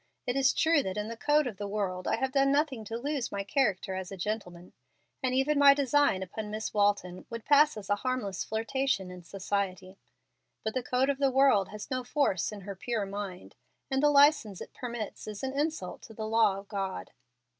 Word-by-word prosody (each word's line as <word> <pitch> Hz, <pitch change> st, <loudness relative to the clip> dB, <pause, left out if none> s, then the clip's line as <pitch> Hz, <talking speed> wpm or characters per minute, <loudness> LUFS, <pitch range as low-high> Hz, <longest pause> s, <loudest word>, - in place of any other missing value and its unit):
It 245 Hz, -, -1 dB
is 270 Hz, -1 st, +4 dB
true 320 Hz, -2 st, +4 dB
that 190 Hz, -5 st, -4 dB
in 210 Hz, +1 st, -3 dB
the 230 Hz, -, -5 dB
code 295 Hz, +5 st, +2 dB
of 230 Hz, -6 st, -5 dB
the 205 Hz, -, -4 dB
world 195 Hz, -3 st, -3 dB
I -, -, +2 dB
have 265 Hz, +3 st, -1 dB
done 275 Hz, 0 st, +3 dB
nothing 280 Hz, -5 st, +1 dB
to 225 Hz, +2 st, -4 dB
lose 280 Hz, 0 st, -2 dB
my 200 Hz, 0 st, -3 dB
character 200 Hz, -4 st, 0 dB
as 190 Hz, 0 st, -5 dB
a 195 Hz, -, -6 dB
gentleman, 180 Hz, -3 st, -5 dB, 0.5 s
and 255 Hz, -2 st, 0 dB
even 285 Hz, +2 st, +2 dB
my 280 Hz, -1 st, +8 dB
design 280 Hz, -7 st, +2 dB
upon 210 Hz, +3 st, -6 dB
Miss 215 Hz, +1 st, -4 dB
Walton 200 Hz, -3 st, 0 dB
would 230 Hz, -1 st, -7 dB
pass 295 Hz, -2 st, +5 dB
as 200 Hz, -2 st, -8 dB
a 205 Hz, -, +1 dB
harmless 230 Hz, -5 st, -2 dB
flirtation 220 Hz, -3 st, -1 dB
in 180 Hz, 0 st, -9 dB
society; 190 Hz, 0 st, -3 dB, 0.6 s
but 220 Hz, -, -2 dB
the 255 Hz, -, 0 dB
code 255 Hz, +3 st, +1 dB
of 275 Hz, -, -5 dB
the 275 Hz, -1 st, +3 dB
world 265 Hz, -7 st, +4 dB
has 210 Hz, +3 st, -8 dB
no 255 Hz, -1 st, -1 dB
force 245 Hz, -, 0 dB
in 210 Hz, -1 st, -8 dB
her 200 Hz, +1 st, -7 dB
pure 220 Hz, +2 st, -2 dB
mind, 195 Hz, -2 st, -6 dB, 0.4 s
and 265 Hz, 0 st, +2 dB
the 295 Hz, -, +5 dB
license 285 Hz, -, +4 dB
it -, -, -9 dB
permits 235 Hz, -5 st, -6 dB
is 210 Hz, +1 st, -7 dB
an 265 Hz, 0 st, -2 dB
insult 295 Hz, -, -2 dB
to 220 Hz, -, -13 dB
the 220 Hz, -, -4 dB
law 220 Hz, -3 st, +3 dB
of 195 Hz, 0 st, -10 dB
God. 195 Hz, -, -4 dB
220 Hz, 210 wpm, -29 LUFS, 195-270 Hz, 0.6 s, my